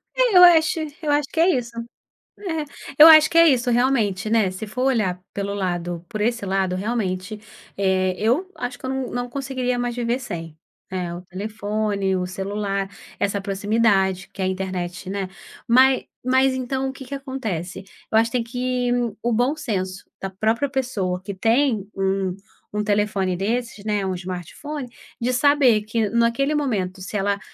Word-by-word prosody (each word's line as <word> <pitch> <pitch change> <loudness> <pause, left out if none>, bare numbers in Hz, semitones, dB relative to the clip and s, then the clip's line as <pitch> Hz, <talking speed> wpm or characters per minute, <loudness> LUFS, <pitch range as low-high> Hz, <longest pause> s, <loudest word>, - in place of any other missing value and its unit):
É, - - +4
eu 360 - +10
acho 325 -2 +6 0.2
eu 300 -2 0
acho 290 -1 +2
que - - -3
é 340 +3 +5
isso. 245 -7 0 0.7
É, 325 -6 -3 0.3
eu 305 - +11
acho 315 -1 +9
que 335 - -3
é 335 - +8
isso. 250 -3 +2
Realmente, 230 -5 +1
né, 220 -4 +3
se 185 +4 -6
for 250 +5 -3
olhar 210 -9 +1
pelo 200 0 -2
lado 175 -3 -3
por 215 - -5
esse 235 -1 0
lado, 190 -1 0
realmente, 200 -1 -2 0.4
eh, 190 -1 +1
eu 260 - +1
acho 245 0 -5
que 260 - -7
eu - - -2
não 265 -1 -3
não 245 0 -3
conseguiria 255 -1 -2
mais 245 0 -2
viver 240 0 -1
sem, 165 -11 -7 0.3
eh, 180 -2 -3
o 175 - -7
telefone, 205 0 -2
o 180 0 -1
celular, 195 +1 -3 0.3
essa 200 0 0
proximidade 195 -1 +1
que 195 - -10
é 185 - +1
a - - +1
internet, 185 -1 -4
né. 195 -1 -3 0.4
Mas 260 +2 +5 0.2
mas 260 +1 +3
então, 260 +1 -2
o - - -4
que 270 0 -10
que 280 - -7
acontece, 225 - -5 0.3
eu - - +1
acho 225 +1 +4
que 250 - 0
tem 235 - -2
que 250 +1 -1 0.3
o 240 - 0
bom 245 +6 +1
senso 195 -10 -3 0.2
da 195 - -4
própria 220 +8 0
pessoa 210 -10 -2
que 200 0 -6
tem 225 0 +2
um 195 -1 0 0.4
um 210 - 0
telefone 205 -3 0
desses, 225 +1 -2
né, 210 -2 0
um 190 - -1
Smartphone, 185 - -6 0.3
de 240 +2 0
saber 265 -5 +4
que, 220 0 -1
naquele 235 +6 +1
momento, 200 -11 -1
se 200 +3 -3
ela, 200 +1 0
220 Hz, 180 wpm, -22 LUFS, 190-255 Hz, 0.7 s, eu